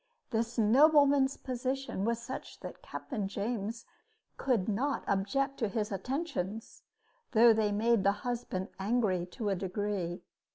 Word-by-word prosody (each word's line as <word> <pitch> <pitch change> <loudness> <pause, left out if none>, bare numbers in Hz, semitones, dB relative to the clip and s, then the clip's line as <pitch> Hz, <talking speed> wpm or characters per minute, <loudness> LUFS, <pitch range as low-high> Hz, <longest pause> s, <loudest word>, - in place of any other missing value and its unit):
This 230 +1 -1
nobleman's 275 +4 +5
position 255 -4 -3
was 230 0 +1
such 255 +3 -7
that - - -8
Captain 215 -9 -4
James 220 +2 -3 0.5
could 245 -8 0
not 255 +7 0
object 270 +8 0
to 225 - +1
his 210 +1 -2
attentions, 225 - -4 0.5
though 230 0 +7
they 215 -1 +1
made 220 0 +2
the 200 - +5
husband 235 -6 -3
angry 195 -4 +1
to 205 +3 -3
a 195 - +1
degree. 190 -2 -3
225 Hz, 130 wpm, -31 LUFS, 200-255 Hz, 0.5 s, though